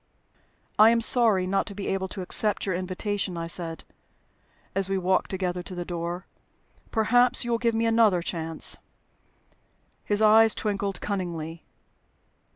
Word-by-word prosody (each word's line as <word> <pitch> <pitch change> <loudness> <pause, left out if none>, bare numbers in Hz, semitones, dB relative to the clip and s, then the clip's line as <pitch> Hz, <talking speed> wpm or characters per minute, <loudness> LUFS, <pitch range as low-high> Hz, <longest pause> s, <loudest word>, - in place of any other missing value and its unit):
"I 215 +1 +8
am 230 0 +3
sorry 225 -5 +3
not 195 +1 0
to 200 - -8
be 200 - -5
able 190 0 -1
to 190 0 -6
accept 210 +3 +2
your 190 - -1
invitation," 185 +1 -3
I 165 - -3
said, 165 -1 -4 0.9
as 195 0 -1
we 195 - 0
walked 185 0 0
together 180 -2 -3
to 185 +1 -7
the 175 0 -5
door. 175 +1 -5 0.6
"Perhaps 245 +3 +3
you 240 - -2
will 230 - +1
give 230 -1 0
me 225 +1 +1
another 225 -6 +3
chance?" 165 -2 -4 1.3
His 205 0 0
eyes 220 +1 +6
twinkled 200 -2 -3
cunningly. 170 -5 -5
195 Hz, 150 wpm, -26 LUFS, 180-220 Hz, 1.3 s, I